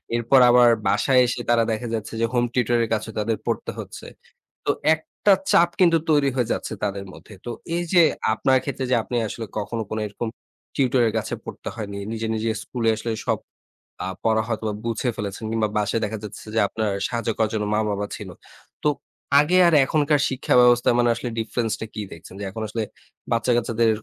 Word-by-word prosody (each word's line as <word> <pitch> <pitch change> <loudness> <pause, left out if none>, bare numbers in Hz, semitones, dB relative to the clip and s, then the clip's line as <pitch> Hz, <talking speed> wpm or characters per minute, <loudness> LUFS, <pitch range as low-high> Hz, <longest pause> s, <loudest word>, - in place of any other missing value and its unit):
এরপর 120 +3 +4
আবার 120 0 +7 0.2
বাসায় 130 -1 +3
এসে 120 - -2
তারা 120 -1 +4
দেখা 110 +2 -3
যাচ্ছে 110 -1 -4
যে - - +4
হোম 120 -1 +2
টিউটর 120 -1 +2
এর 115 - -3
কাছে 110 +1 -2
তাদের 110 +1 0
পড়তে - - -2
হচ্ছে। - - -8 0.6
তো - - +3 0.2
একটা 160 +5 0 0.2
চাপ 170 0 +5
কিন্তু 170 -3 +5
তৈরি 145 -3 +4
হয়ে 125 -3 0
যাচ্ছে - - -4
তাদের 100 -1 -2
মধ্যে। - - -14
তো - - -4 0.3
এই 175 - 0
যে 175 - +7 0.3
আপনার 130 +3 +3
ক্ষেত্রে 135 -1 -3
যে - - +5
আপনি 125 - -5
আসলে 115 +2 -5
কখনো 110 +2 -3 0.2
এরকম 110 +3 -4 0.5
টিউটর 130 -2 +2
এর 110 - -1
কাছে - - -3
পড়তে - - -7
হয়নি। 100 -3 -5
নিজে, 115 0 -3
নিজে 110 +1 -1
স্কুলে 115 -3 -1
আসলে 115 +1 -4 0.2
সব - - +2 0.7
আ - - -3 0.2
পড়া 110 -1 +3
হয়তো 110 -1 -3
বা 105 - -2
বুঝে 115 +2 -1
ফেলেছেন 105 0 -5
কিংবা 110 -1 +1
বাসায় 105 +2 +1
দেখা 110 +1 -3
যাচ্ছে 105 - -9
যে - - +1
আপনার 110 0 -2 0.2
সাহায্য 115 -1 -3
করার 110 -1 +2
জন্য 105 -1 0
মা 105 - +2
বাবা 100 0 -2
ছিল। 105 - -8 0.5
তো - - +2 0.5
আগে 160 +5 +2
আর 170 - +3
এখনকার 150 +1 +2
শিক্ষা 130 0 -1
ব্যবস্থা 120 0 +5
মানে 120 0 +3
আসলে 115 +2 -4
ডিফারেন্স 115 0 -1
টা 110 - -4
কি - - -4
দেখছেন? 85 +2 -11
যে - - -4
এখন 110 +3 -6
আসলে 110 +2 -2 0.5
বাচ্চা 115 +2 +2
কাচ্চাদের 115 -1 +1
115 Hz, 195 wpm, -23 LUFS, 110-125 Hz, 0.7 s, আবার